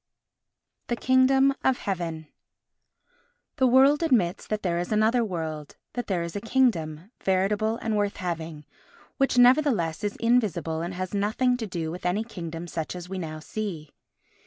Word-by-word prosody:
The 240 - 0
Kingdom 265 +2 +4
of 260 -1 +3
Heaven 165 -5 -4 1.3
The 260 - +4
world 270 +4 +5
admits 215 - +1
that 215 -1 -3
there 170 -2 0
is 175 - -4
another 220 +3 +3
world, 160 -7 -5 0.2
that 245 - -4
there 180 -4 0
is 170 +2 -6
a 205 - -3
kingdom, 200 -8 0
veritable 205 +4 +1
and 220 -1 0
worth 205 -1 0
having, 165 -4 -5 0.5
which, 270 -2 +1
nevertheless, 245 - +4
is 205 0 -2
invisible 215 -9 +1
and 175 +2 -4
has 185 +1 -4
nothing 220 +5 +1
to 225 -3 -4
do 165 -4 -3
with 180 +1 -4
any 200 +5 0
kingdom 170 -7 -7
such 165 0 -4
as 180 0 -8
we 190 -1 -4
now 155 -3 -5
see. 165 -6 -5
200 Hz, 160 wpm, -26 LUFS, 170-240 Hz, 1.3 s, world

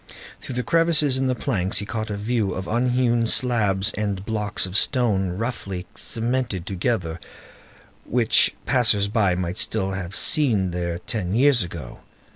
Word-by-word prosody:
Through 130 - -6
the 125 - -1
crevices 165 -5 +3
in 135 - 0
the 130 - 0
planks 95 -8 0
he 100 - -1
caught 110 +1 -4
a 105 - -3
view 105 -2 -1
of 95 - -5
unhewn 120 0 +1
slabs 110 -5 +2
and 100 -2 -3
blocks 105 -3 -1
of 95 0 -8
stone 100 -7 +1
roughly 100 -5 -4
cemented 115 -6 -2
together, 90 -4 -2 0.9
which 120 -2 +2
passers 110 -6 +3
by 100 -4 +1
might 90 -1 -3
still 95 0 0
have 95 0 -5
seen 110 -12 +3
there 85 -1 -3
ten 95 0 -3
years 130 0 +4
ago. 85 -8 -7
105 Hz, 150 wpm, -23 LUFS, 95-125 Hz, 0.9 s, years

